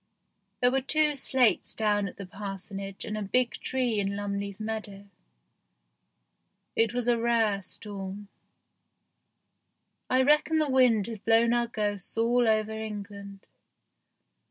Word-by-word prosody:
There 245 Hz, 0 st, +4 dB
were 270 Hz, +1 st, +1 dB
two 300 Hz, +2 st, +2 dB
slates 260 Hz, -3 st, +2 dB
down 205 Hz, -2 st, +1 dB
at -, -, -10 dB
the 195 Hz, -, -7 dB
parsonage 195 Hz, 0 st, -6 dB
and 210 Hz, -, -4 dB
a 215 Hz, -, -3 dB
big 240 Hz, +5 st, +1 dB
tree 250 Hz, -4 st, -1 dB
in 200 Hz, 0 st, -1 dB
Lumley's 200 Hz, 0 st, -4 dB
meadow. 215 Hz, -2 st, -5 dB, 1.7 s
It 225 Hz, -1 st, +3 dB
was 245 Hz, 0 st, -2 dB
a 240 Hz, -1 st, +3 dB
rare 225 Hz, -4 st, +1 dB
storm. 200 Hz, +1 st, -5 dB, 1.8 s
I 260 Hz, +1 st, +3 dB
reckon 300 Hz, +3 st, +3 dB
the 305 Hz, -3 st, +1 dB
wind 245 Hz, -6 st, +4 dB
had 225 Hz, -3 st, -7 dB
blown 230 Hz, +1 st, +4 dB
our 240 Hz, 0 st, +1 dB
ghosts 205 Hz, -3 st, -4 dB
all 235 Hz, +1 st, +3 dB
over 215 Hz, 0 st, +2 dB
England. 205 Hz, -2 st, -7 dB
220 Hz, 130 wpm, -28 LUFS, 200-240 Hz, 1.8 s, There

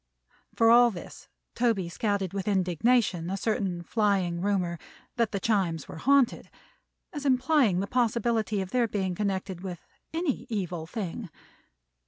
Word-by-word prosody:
For 230 Hz, 0 st, +5 dB
all 240 Hz, 0 st, +7 dB
this 185 Hz, -6 st, -10 dB, 0.3 s
Toby 225 Hz, -7 st, +1 dB
scouted 200 Hz, 0 st, -1 dB
with 195 Hz, 0 st, -4 dB
indignation 190 Hz, -1 st, +1 dB
a 195 Hz, -, -2 dB
certain 195 Hz, -4 st, -1 dB
flying 190 Hz, -4 st, 0 dB
rumor 180 Hz, -4 st, 0 dB, 0.4 s
that 230 Hz, -3 st, +1 dB
the 200 Hz, -, -2 dB
Chimes 185 Hz, -7 st, 0 dB
were -, -, -9 dB
haunted, 270 Hz, +5 st, +2 dB, 0.6 s
as 295 Hz, -3 st, -5 dB
implying 255 Hz, -, +3 dB
the -, -, -1 dB
possibility 230 Hz, -2 st, 0 dB
of 190 Hz, 0 st, -6 dB
their 245 Hz, -2 st, +2 dB
being 190 Hz, -4 st, -2 dB
connected 190 Hz, -2 st, -3 dB
with 180 Hz, -3 st, -7 dB, 0.3 s
any 325 Hz, -4 st, -2 dB
Evil 180 Hz, -7 st, -3 dB
thing. 200 Hz, 0 st, -5 dB
200 Hz, 140 wpm, -28 LUFS, 180-235 Hz, 0.6 s, all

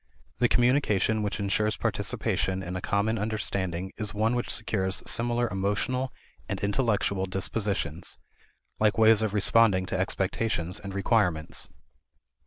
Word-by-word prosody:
The -, -, +4 dB
communication 110 Hz, -3 st, +2 dB
which 105 Hz, 0 st, -2 dB
insures 105 Hz, +1 st, 0 dB
participation 95 Hz, 0 st, -1 dB
in 90 Hz, 0 st, -5 dB
a 90 Hz, -, -3 dB
common 105 Hz, +3 st, 0 dB
understanding 95 Hz, -4 st, -2 dB
is 105 Hz, -2 st, -4 dB
one 110 Hz, +3 st, +1 dB
which 120 Hz, 0 st, -2 dB
secures 100 Hz, -4 st, -1 dB
similar 120 Hz, +1 st, +1 dB
emotional 105 Hz, +7 st, -1 dB, 0.4 s
and -, -, -2 dB
intellectual 100 Hz, -3 st, 0 dB
dispositions 95 Hz, -4 st, -2 dB, 0.6 s
like 105 Hz, -1 st, +2 dB
ways 110 Hz, -1 st, +6 dB
of 110 Hz, -1 st, -1 dB
responding 105 Hz, -2 st, +4 dB
to 95 Hz, 0 st, -3 dB
expectations 95 Hz, -1 st, -1 dB
and 100 Hz, -1 st, -7 dB
requirements. 90 Hz, -6 st, 0 dB
105 Hz, 125 wpm, -27 LUFS, 95-110 Hz, 0.6 s, ways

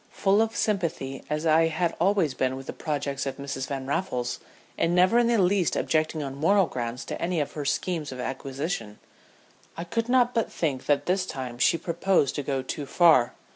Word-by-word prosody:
Full 200 Hz, +2 st, +3 dB
of 225 Hz, 0 st, -1 dB
sympathy 170 Hz, -10 st, -2 dB
as 150 Hz, +2 st, -2 dB
I 165 Hz, +1 st, +4 dB
had 165 Hz, +1 st, -1 dB
always 180 Hz, -5 st, +2 dB
been 130 Hz, 0 st, -1 dB
with 135 Hz, 0 st, -8 dB
the -, -, -6 dB
projects 140 Hz, -3 st, -3 dB
of 135 Hz, -, -4 dB
Mrs. 135 Hz, -2 st, -4 dB
Van 135 Hz, -2 st, -4 dB
Raffles, 125 Hz, -5 st, -2 dB, 0.4 s
and 170 Hz, +1 st, +1 dB
never 185 Hz, +6 st, +5 dB
in 240 Hz, -, +3 dB
the 235 Hz, -1 st, +3 dB
least 185 Hz, -2 st, +2 dB
objecting 155 Hz, -1 st, 0 dB
on 135 Hz, -1 st, -5 dB
moral 185 Hz, +8 st, +3 dB
grounds 120 Hz, -3 st, -5 dB
to -, -, -6 dB
any 175 Hz, -1 st, 0 dB
of 145 Hz, -1 st, -2 dB
her 150 Hz, -2 st, -5 dB
schemes 155 Hz, +1 st, -1 dB
of 130 Hz, -, -7 dB
acquisition, 135 Hz, -, -4 dB, 0.8 s
I 170 Hz, -, -3 dB
could 230 Hz, +7 st, -2 dB
not 250 Hz, -1 st, +3 dB
but 230 Hz, -2 st, 0 dB
think 140 Hz, -6 st, -2 dB
that 145 Hz, -1 st, +2 dB
this 185 Hz, +1 st, 0 dB
time 125 Hz, -5 st, -6 dB
she 145 Hz, -, +4 dB
proposed 170 Hz, -2 st, +1 dB
to 145 Hz, -, -2 dB
go 135 Hz, -1 st, -2 dB
too 140 Hz, +2 st, -5 dB
far. 155 Hz, -9 st, +4 dB
155 Hz, 200 wpm, -26 LUFS, 135-180 Hz, 0.8 s, never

